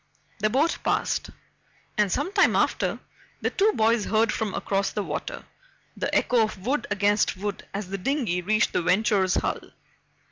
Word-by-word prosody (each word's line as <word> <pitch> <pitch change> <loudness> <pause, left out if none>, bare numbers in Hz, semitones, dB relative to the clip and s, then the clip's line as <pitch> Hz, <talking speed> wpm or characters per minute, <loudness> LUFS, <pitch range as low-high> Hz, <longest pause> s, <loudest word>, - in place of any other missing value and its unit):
The 215 +1 +2
boat 285 +9 +1
passed, - - 0 0.7
and 210 -2 +2
some 300 - -1
time 395 -3 +4
after, - - +1 0.4
the - - 0
two 415 +3 +3
boys 225 0 +2
heard 220 +1 +2
from 215 -3 -2
across 195 0 0
the 210 - -2
water - - -5 0.5
the - - -2
echo 245 -2 +3
of 215 -3 -2
wood 280 +4 0
against 205 0 +1
wood 205 +1 -5
as 200 -2 -5
the 195 +1 -4
dinghy 230 -6 0
reached 215 +4 +1
the - - +1
Venture's 190 +1 +2
hull. - - 0
210 Hz, 165 wpm, -25 LUFS, 195-235 Hz, 0.7 s, time